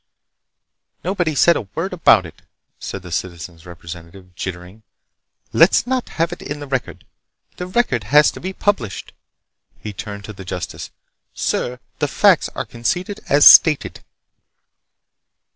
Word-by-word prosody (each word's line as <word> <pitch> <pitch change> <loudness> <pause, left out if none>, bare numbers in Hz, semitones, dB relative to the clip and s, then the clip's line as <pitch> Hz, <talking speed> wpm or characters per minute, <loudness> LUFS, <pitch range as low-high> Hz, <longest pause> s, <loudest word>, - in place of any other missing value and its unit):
"Nobody's 175 -5 -1
said 170 - +5
a 105 - -4
word 185 +3 -3
about 115 - +4
it," 80 - -13 0.4
said 100 - -7
the 90 - -10
Citizen's 85 -1 -6
Representative, 85 +2 -11
jittering. 90 +3 -7 0.7
"Let's 165 +7 +5
not 255 0 -2
have 165 +1 0
it - - -10
in 145 +1 -6
the 145 - -7
record! 135 -2 -4 0.5
The 180 - -5
record 180 - 0
has 150 +6 +5
to - - -11
be 185 - -5
published." 190 - -2 0.6
He 105 - -8
turned 100 0 -8
to 105 - -8
the 95 - -10
justice. 90 -1 -6 0.5
"Sir, 125 +1 -2 0.2
the - - +1
facts - - +3
are - - -3
conceded 180 - -3
as 145 +1 +5
stated." 155 -4 +6
120 Hz, 140 wpm, -19 LUFS, -, 0.7 s, stated